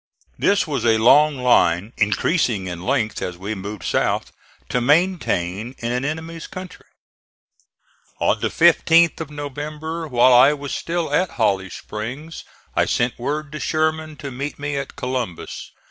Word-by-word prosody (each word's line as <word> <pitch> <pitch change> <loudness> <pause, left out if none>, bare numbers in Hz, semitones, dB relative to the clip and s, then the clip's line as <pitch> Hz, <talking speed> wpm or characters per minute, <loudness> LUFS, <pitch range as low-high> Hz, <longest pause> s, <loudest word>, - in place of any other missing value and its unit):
This 200 0 +3
was 145 -3 -2
a 115 -1 +4
long 145 +6 +5
line 100 -3 +3
(increasing 105 - +1
in 85 -2 -5
length 120 -1 -1
as 90 -1 -4
we 100 +4 -4
moved 100 0 -7
south) - - 0 0.4
to 125 - 0
maintain 125 - +1
in 120 0 -3
an 125 +1 -1
enemy's 160 +3 -5
country. 185 0 -10 1.3
On - - +2
the - - -1
15th 165 0 +4
of 160 - -5
November, 150 +3 -5
while 125 -1 +5
I 130 +4 +7
was 145 -1 -6
still 165 -3 -2
at 180 +4 +2
Holly 95 -4 +1
Springs, 125 - -7 0.3
I - - +3
sent 120 +1 0
word 145 +4 -3
to 150 - -6
Sherman 155 0 -1
to 145 -2 -7
meet 140 +4 -5
me 145 0 -3
at 140 -1 -5
Columbus. 125 -8 -4
140 Hz, 150 wpm, -21 LUFS, 115-155 Hz, 1.3 s, I